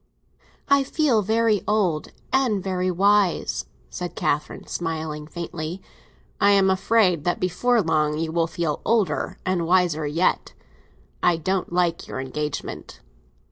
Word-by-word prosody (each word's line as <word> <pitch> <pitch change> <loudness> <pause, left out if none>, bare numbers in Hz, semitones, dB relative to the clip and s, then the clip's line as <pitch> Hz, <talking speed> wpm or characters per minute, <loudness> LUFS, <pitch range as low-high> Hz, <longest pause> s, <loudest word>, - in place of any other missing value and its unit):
"I 280 0 +4
feel 270 -5 +2
very 220 0 +2
old—and 210 - 0
very 185 -1 -1
wise," 200 +1 +2 0.3
said 180 -1 -5
Catherine, 150 +1 -2
smiling 155 -2 -4
faintly. 170 +1 -5 0.6
"I 200 - +5
am 195 -1 +4
afraid 190 -4 +2
that 175 - 0
before 220 +6 +1
long 150 -2 +1
you 160 0 -2
will 165 0 +1
feel 165 -3 -2
older 220 -3 0
and 180 -3 0
wiser 170 -4 +2
yet. 165 +5 0 0.7
I 175 -2 +3
don't 185 +3 -2
like 175 -1 0
your - - -5
engagement." 145 +3 -5
180 Hz, 125 wpm, -23 LUFS, 160-200 Hz, 0.7 s, I